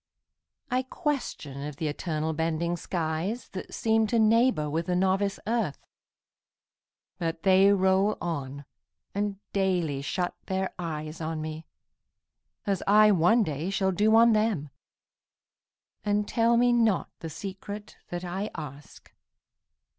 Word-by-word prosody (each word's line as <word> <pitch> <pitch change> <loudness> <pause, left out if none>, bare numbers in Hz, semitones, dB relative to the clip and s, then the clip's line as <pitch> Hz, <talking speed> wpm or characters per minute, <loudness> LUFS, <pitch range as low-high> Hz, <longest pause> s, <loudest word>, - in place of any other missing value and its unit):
I 255 +1 +2
question 260 - -3
of 150 -1 -5
th' 155 - -7
eternal 155 +1 -2
bending 165 +2 -1
skies 175 +7 -3
That 185 - -7
seem 220 -1 +2
to 235 - +1
neighbor 225 -6 +4
with 160 +3 -2
the 180 - +1
novice 190 +2 +1
earth; 220 -10 0 1.4
But 165 -1 -3
they 195 +1 +6
roll 190 +1 +3
on, 145 -4 -4 0.5
and 205 0 -1 0.2
daily 180 -8 0
shut 175 +5 -2
their 190 0 -1
eyes 155 -2 -5
On 160 0 -3
me, 155 +1 -6 1.0
as 200 -2 0
I 210 +1 +7
one 205 +6 +4
day 155 0 -3
shall 195 -1 +1
do 210 +4 +3
on 230 0 +7
them, 210 -10 0 1.3
And 205 0 +1
tell 235 0 +3
me 245 0 +4
not 225 -6 +2
the 165 - -6
secret 200 +5 -7
that 175 +1 -4
I 190 +4 -3
ask. 145 -1 -10
190 Hz, 130 wpm, -27 LUFS, 160-210 Hz, 1.4 s, I